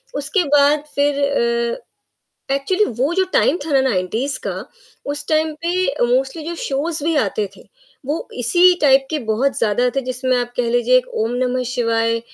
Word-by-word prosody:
उसके 295 +6 0
बाद 290 +1 +4
फिर 285 0 +1
अ, 235 - 0 0.7
एक्चुअली 370 +10 +1
वो 260 - -1
जो 380 0 +2
टाइम 325 - +3
था 300 - -3
ना 270 - +5
90s 245 +3 -1
का, - - -4 0.4
उस 290 +1 -4
टाइम 315 0 +1
पे 340 - 0 0.5
मोस्टली 270 +4 -3
जो 340 - -3
शोज़ 290 +3 -2
भी 325 0 +1
आते 210 -4 0
थे, - - -15 0.4
वो 300 +3 -3
इसी 355 +9 +4
टाइप 270 -2 +4
के 310 - -1
बहुत 260 +6 +1
ज़्यादा 230 +3 +1
थे, - - +3
जिसमें 255 0 -1
आप 245 0 -3
कह 240 -1 0
लीजिए 245 +1 +3
एक 255 - -4 0.2
ओम 230 +2 -1
नमः 255 0 0
शिवाय, 230 -1 0
270 Hz, 175 wpm, -19 LUFS, 240-295 Hz, 0.7 s, ना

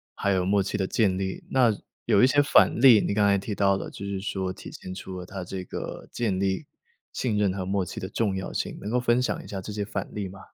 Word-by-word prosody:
还 100 - 0
有 90 -1 +1
默 100 +1 +3
契 - - -2
的 95 - 0
建 95 -4 +2
立。 95 -1 -3
那 125 -4 +4 0.3
有 100 - +4
一 - - +8
些 145 +1 +4
反 140 - +4
例， 120 -5 +8
你 - - 0
刚 105 -1 +3
才 100 - +4
提 100 +2 -4
到 100 -1 +3
了， 95 - -5
就 100 - -8
是 100 -1 -3
说 95 -2 -2
体 - - -10
现 90 - -8
出 95 0 -7
了 90 - -7
它 95 +1 -6
这 90 +1 -5
个 - - -6
建 105 -6 -1
立 95 -1 0 0.5
信 115 -5 -1
任 100 -3 +2
和 95 -1 -4
默 95 0 0
契 - - -7
的 95 - -4
重 100 0 -1
要 95 - -4
性， - - -3
能 105 - -5
够 125 +2 +2
分 120 0 +2
享 125 - -2
一 - - -12
下 100 - -5
这 105 - -7
些 105 0 -2
反 110 - -4
例 105 -3 -3
吗？ 95 +1 -11
100 Hz, 290 characters per minute, -26 LUFS, 95-105 Hz, 0.5 s, 一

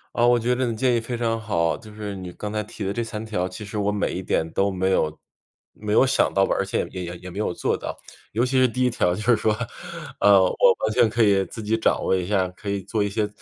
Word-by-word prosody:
啊， 120 0 +4
我 120 0 +5
觉 120 +2 +1
得 125 0 0
你 115 - -2
建 125 +1 +2
议 - - +2
非 120 +1 -4
常 115 -1 -1
好， 85 -6 0
就 110 -2 -12
是 105 -1 -6
你 90 -2 -7
刚 105 0 -6
才 105 - 0
提 105 0 -8
的 100 +1 -1
这 120 - -1
3 110 -1 -6
条， 90 -4 -2
其 100 +3 -8
实 105 +1 -4
我 100 0 +1
每 105 - -1
一 - - -3
点 80 - 0
都 100 +1 +2
没 95 0 0
有 80 -4 0 0.5
没 105 0 -5
有 130 - +5
想 130 - +2
到 95 0 +3
吧， - - 0
而 - - +1
且 - - -2
也 90 - -5
也 85 0 -6
也 90 - -9
没 100 - -6
有 105 - 0
做 - - -1
到。 - - -6 0.3
尤 115 +4 +1
其 130 0 +2
是 130 - +6
第 125 +2 -1
一 125 - +2
条 90 -6 +1
就 105 - -5
是 120 0 +4
说。 110 0 +1 0.6
呃， 100 -1 +7
我 95 +1 +4
完 110 - 0
全 120 -2 +4
可 115 +1 0
以 100 -2 +4
自 115 - -8
己 110 +2 +1
掌 110 - +1
握 - - +2
一 90 -1 -1
下， 95 -2 +1
可 100 +3 -8
以 100 -1 -1
做 105 +2 -1
一 100 - -1
些 105 +1 0
105 Hz, 305 characters per minute, -24 LUFS, 95-115 Hz, 0.6 s, 呃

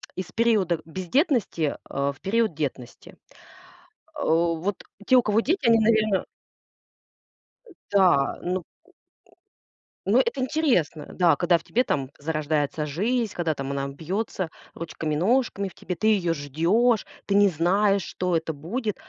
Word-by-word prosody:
из 185 -1 -6
периода 210 -8 +2
бездетности, 185 - 0
э, 140 +1 -1
в 140 - -23
период 215 -1 +1
детности. 135 -5 -6 1.0
Э, - - -3
вот 170 +4 0 0.2
те, 260 - +5
у 250 - +6
кого 215 0 +2
дети, 305 +1 0
они, 230 0 +6
наверно 215 -3 +2 1.7
Да, 180 -9 +3
ну 180 0 -2 1.5
Ну, - - +5
это 470 - 0
интересно, 255 - 0
да, 175 -2 +4
когда 175 -1 +3
в 165 - -14
тебе 250 - +1
там 135 - -2
зарождается 155 0 -1
жизнь, 215 - -1
когда 165 -2 0
там 135 -1 -5
она 140 0 -2
бьется 180 +4 -3 0.2
ручками-ножками 185 - -1
в 185 - -11
тебе, 180 - -5
ты 215 - 0
её 190 -6 +2
ждешь. 170 - +1 0.2
Ты 200 - 0
не 205 -1 +6
знаешь, 195 +4 +2
что 180 +1 -1
это 160 0 -4
будет. 210 - -3
180 Hz, 135 wpm, -25 LUFS, 160-220 Hz, 1.7 s, у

